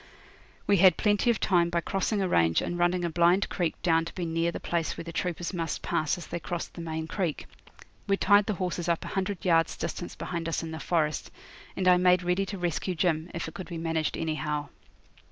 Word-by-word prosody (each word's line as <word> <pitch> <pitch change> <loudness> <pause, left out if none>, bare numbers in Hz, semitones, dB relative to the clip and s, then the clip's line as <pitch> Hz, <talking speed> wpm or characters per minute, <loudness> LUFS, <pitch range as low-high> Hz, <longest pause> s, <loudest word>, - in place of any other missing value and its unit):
We 200 - +4
had 185 0 +6
plenty 210 +2 +2
of 235 - +2
time 175 -3 +3
by 170 0 0
crossing 195 +3 -1
a - - +1
range 80 - +3
and 175 - -3
running 175 0 +1
a - - 0
blind 175 +4 +3
creek 175 -4 -2
down 165 -1 +3
to - - -9
be 180 - -2
near 165 +1 0
the - - -5
place 170 -2 -2
where - - -5
the 170 - -7
troopers 175 +1 -2
must 165 -3 -3
pass 155 +1 0
as 175 - -8
they - - -4
crossed 175 +1 -5
the 170 - -7
main 160 -1 -3
creek. 170 -2 -2 0.6
We 200 0 +2
tied 205 +1 +6
up 205 - -2
the 215 - +1
horses 180 -2 -3
a 170 -1 +2
hundred 195 -1 -3
yards' 165 -2 +3
distance 175 - -5
behind 170 -2 -4
us 165 - -2
in 165 - -5
the 160 - -5
forest, 155 -4 0 0.5
and 185 - 0
I 180 0 +7
made 180 0 +4
ready 180 +2 0
to 200 - -5
rescue 175 +1 -2
Jim, 165 -1 0
if 170 - -3
it 160 - -8
could 185 - -7
be 170 - -5
managed 160 -1 -1
anyhow. 150 -2 -2
175 Hz, 225 wpm, -28 LUFS, 165-185 Hz, 0.6 s, I